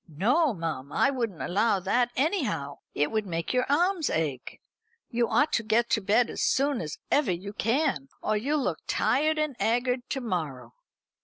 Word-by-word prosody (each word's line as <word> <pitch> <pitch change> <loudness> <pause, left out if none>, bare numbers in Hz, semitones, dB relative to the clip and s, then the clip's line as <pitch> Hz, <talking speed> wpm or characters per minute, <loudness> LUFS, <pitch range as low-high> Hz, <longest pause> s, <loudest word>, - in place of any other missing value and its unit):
"No, 245 - +2
mum, 155 -5 -4
I 275 - +3
wouldn't 230 - -3
allow 205 +2 +2
that 240 +6 +1
anyhow. 265 - -1 0.2
It 145 - +1
would 215 -2 -1
make 165 +2 -3
your 255 +2 +1
arms 345 +2 +2
ache. 145 -6 -3 0.5
You 235 -1 +1
ought 295 +1 +2
to 230 - +2
get 230 +2 +1
to 215 - +2
bed 215 +5 +3
as - - -4
soon 275 -2 +2
as 150 -3 -5
ever 285 -9 +3
you 190 +4 -5
can, 225 - 0
or 215 - 0
you'll 280 +7 0
look 175 -8 -1
tired 310 +4 +2
and 305 -3 -1
'aggard 245 +2 0
to 270 - -1
morrow." 145 - -4
230 Hz, 175 wpm, -27 LUFS, 170-275 Hz, 0.5 s, I